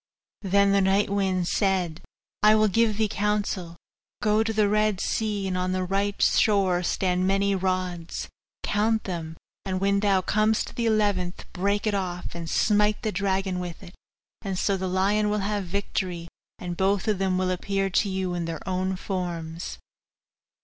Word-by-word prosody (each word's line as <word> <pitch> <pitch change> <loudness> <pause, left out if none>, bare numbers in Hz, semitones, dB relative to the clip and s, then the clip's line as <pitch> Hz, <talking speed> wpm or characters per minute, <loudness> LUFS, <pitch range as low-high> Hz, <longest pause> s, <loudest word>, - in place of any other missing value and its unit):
Then 200 0 +3
the 200 0 +4
night 195 +1 +2
wind 190 -3 0
said, 185 -6 0 0.4
'I 215 +1 +6
will 215 0 +4
give 220 +1 +2
thee 220 -1 +2
counsel. 205 -4 -1 0.4
Go 215 +1 +2
to 225 0 0
the 215 -1 +2
Red 210 -1 +2
Sea; 210 -2 -1
on 185 0 -1
the 185 0 0
right 200 +2 -1
shore 195 -4 +3
stand 180 0 0
many 195 +1 +2
rods 185 -3 -2 0.4
count 220 +1 +1
them, 165 -3 -5 0.3
and 185 -1 -2
when 200 +1 +2
thou 200 -2 +3
comest 215 +3 +1
to - - -14
the 235 -1 -1
eleventh, 205 -5 0
break 200 +3 0
it 215 - +1
off, 180 -3 -3
and 170 -1 -6
smite 210 +1 +2
the 215 - 0
dragon 190 -1 -1
with 175 0 -6
it; 180 -1 -12 0.5
and 195 -3 -3
so 200 +1 +1
the 190 0 -3
lion 200 +3 +2
will 210 - +1
have 205 -1 -1
the - - -11
victory, 180 -3 -3 0.3
and 175 -1 -5
both 195 +1 +1
of 210 -3 +1
them 190 -1 +1
will 185 0 0
appear 195 +1 -1
to 200 +3 +2
you 190 -1 -2
in 175 -1 -2
their 165 +1 -6
own 185 0 -1
forms. 175 -3 -4
195 Hz, 175 wpm, -26 LUFS, 180-205 Hz, 0.5 s, I